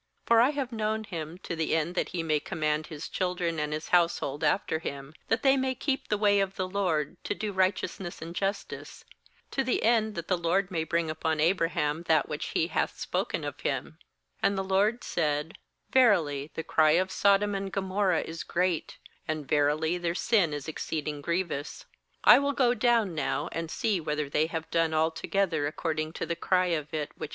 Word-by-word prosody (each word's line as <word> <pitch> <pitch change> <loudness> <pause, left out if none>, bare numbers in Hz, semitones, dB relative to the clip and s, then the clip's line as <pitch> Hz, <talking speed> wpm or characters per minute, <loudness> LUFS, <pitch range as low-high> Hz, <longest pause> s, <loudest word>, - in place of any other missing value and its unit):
19For 230 -1 +7
I 250 - +5
have 280 -4 -3
known 220 -1 -1
him, 165 -4 -6
to 170 - -4
the 160 0 0
end 160 +2 0
that 180 - -1
he 170 -2 -3
may 155 -2 +1
command 155 0 -1
his 155 -4 -7
children 180 -3 -1
and 150 0 -2
his 155 +1 -4
household 170 -5 +2
after 170 -4 +1
him, 140 -2 -6
that 225 - 0
they 270 -1 +5
may 260 -1 0
keep 270 +1 -2
the 210 - +1
way 205 -1 +4
of 195 0 -1
the 185 -1 -2
LORD, 180 -7 -1
to - - -2
do 215 -1 -3
righteousness 185 -1 -1
and 165 +1 -7
justice; 195 +2 -4 0.5
to 270 - 0
the 255 - 0
end 220 -2 +2
that 170 -2 -5
the 180 -2 +1
LORD 180 +3 +1
may 165 -3 0
bring 165 0 0
upon 160 0 -1
Abra 165 +1 +3
ham 150 -1 -1
that 155 -3 +3
which - - -4
He - - +1
hath - - -1
spoken - - -2
of - - -5
him/ - - -3 0.4
20And 200 - +3
the 195 - -1
LORD 200 +5 +1
said: 150 -1 -1 0.3
'Verily, 165 - +3
the 160 - -3
cry 155 -1 +4
of 185 +3 +2
Sodom 200 +1 +3
and 195 0 -3
Gomorrah 190 -2 +1
is 165 +1 -6
great, 180 -2 -1 0.3
and, 155 -3 -3
verily, 155 +4 +2
their 170 -1 -1
sin 195 -6 +2
is 145 -1 -5
exceed 155 -1 -3
ing 150 -1 -3
grievous. 170 -3 -3 0.4
21I - - +9
will 285 0 0
go 250 -3 +3
down 235 -6 +2
now, 155 -3 -1
and 165 -1 -4
see 205 +2 0
whether 150 -1 -2
they 150 +3 +1
have, 160 -1 -4
done 165 -1 +2
alto 160 +1 0
gether 170 -7 +1
according 155 0 -2
to - - -3
the 170 - -2
cry 185 +2 +2
of 150 -2 -3
it, 150 -2 -3
which - - -31
19 - - -5
18. - - -10
170 Hz, 205 wpm, -28 LUFS, 155-200 Hz, 0.5 s, 21I